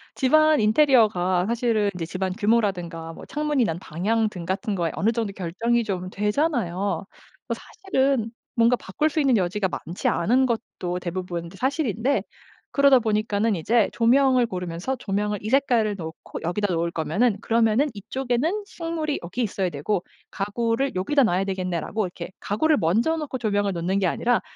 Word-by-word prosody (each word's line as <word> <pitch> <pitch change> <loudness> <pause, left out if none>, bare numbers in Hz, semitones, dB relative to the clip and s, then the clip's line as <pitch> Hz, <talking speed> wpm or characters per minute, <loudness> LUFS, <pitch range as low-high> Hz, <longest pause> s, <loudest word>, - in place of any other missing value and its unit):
집 260 +1 0
안 310 -1 +6
인테리어가 215 -7 +3
사실은 230 -3 +1
이제 175 -2 -4
집 185 +3 -4
안 185 - 0
규모라든가 190 -7 0
뭐 - - -11
창문이 295 -3 0
난 165 -2 -2
방향 215 +7 0
등 180 -5 -8
같은 200 +4 -2
거에 170 -3 -1
어느 220 +3 +2
정도 225 -4 -2
결정이 225 +7 0
좀 185 -4 -3
되잖아요. 210 - 0 0.7
어 - - +1
사실은 270 - -1 0.2
뭔가 235 +1 +4
바꿀 300 +12 -1
수 310 +1 -1
있는 270 -4 +3
여지가 190 +1 0 0.2
많지 175 +3 -3
않은 245 +9 +3
것도 220 -7 -3
대부분 175 -1 -4
이제 185 +3 -13
사실인데 265 - 0 0.5
그러다 280 -2 +5
보니까는 215 -1 0
이제 215 +6 +2
조명을 255 +1 +4
고르면서 180 +4 -4
'조명을 210 -1 -2
이 215 - -4
색깔을 240 -5 +2
놓고 160 -3 -8
여기다 190 +4 -1
놓을 170 0 0
거면은 205 +7 +1
그러면은 230 +4 +2
이 200 - -7
쪽에는 270 - -1
식물이 330 -6 -3
여기 180 +9 -4
있어야 195 -4 -1
되고 170 +6 -1 0.3
가구를 230 +6 -1
여기다 235 +10 +2
놔야 190 -4 +1
되겠네.'라고 190 +2 -2
이렇게 175 -1 -7
가구를 295 +10 +1
먼저 230 - +2
놓고 295 -4 -4
조명을 205 -3 0
놓는 175 +3 -1
게 195 - +1
아니라 235 +7 +1
215 Hz, 380 characters per minute, -24 LUFS, 185-250 Hz, 0.7 s, 안